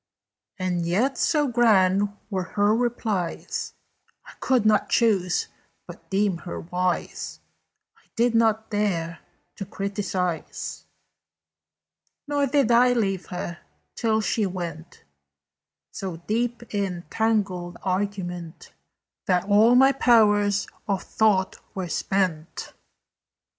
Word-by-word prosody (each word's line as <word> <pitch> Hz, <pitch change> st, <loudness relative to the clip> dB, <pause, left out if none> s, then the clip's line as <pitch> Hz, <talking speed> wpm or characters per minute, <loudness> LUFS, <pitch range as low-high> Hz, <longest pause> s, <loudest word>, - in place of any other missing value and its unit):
"And 180 Hz, -2 st, -1 dB
yet, 235 Hz, +11 st, +1 dB
so 300 Hz, -3 st, +2 dB
grand 205 Hz, -5 st, +3 dB, 0.2 s
were 190 Hz, -1 st, 0 dB, 0.2 s
her 205 Hz, +1 st, +4 dB
replies, 225 Hz, -7 st, -2 dB, 0.5 s
I -, -, -12 dB
could 255 Hz, -5 st, +2 dB
not 215 Hz, -1 st, +3 dB
choose 195 Hz, -7 st, +2 dB, 0.4 s
but -, -, -13 dB
deem 195 Hz, -2 st, +1 dB
her 175 Hz, -, -6 dB
wise; 180 Hz, +1 st, -2 dB, 0.6 s
I -, -, -30 dB
did 240 Hz, -1 st, +2 dB
not 220 Hz, -1 st, +2 dB
dare 175 Hz, -6 st, -1 dB, 0.4 s
to -, -, -4 dB
criticise; 180 Hz, -, -3 dB, 1.4 s
"Nor 285 Hz, -1 st, +1 dB
did 275 Hz, -3 st, +2 dB
I 245 Hz, +1 st, +5 dB
leave 195 Hz, -6 st, -1 dB
her, 175 Hz, -1 st, -5 dB, 0.4 s
till 220 Hz, -2 st, +1 dB
she 215 Hz, -1 st, 0 dB
went 170 Hz, -3 st, -7 dB, 0.9 s
So 185 Hz, -4 st, -5 dB
deep 235 Hz, +6 st, -3 dB
in 190 Hz, -4 st, -2 dB
tangled 200 Hz, -6 st, 0 dB
argument 185 Hz, -3 st, -3 dB, 0.5 s
That 180 Hz, -3 st, +2 dB
all 215 Hz, +4 st, +5 dB
my 265 Hz, +2 st, +7 dB
powers 210 Hz, -6 st, +4 dB, 0.2 s
of 195 Hz, -2 st, -1 dB
thought 200 Hz, -4 st, +1 dB, 0.2 s
were 185 Hz, -3 st, -3 dB
spent." 180 Hz, -3 st, -2 dB
200 Hz, 105 wpm, -25 LUFS, 180-225 Hz, 1.4 s, my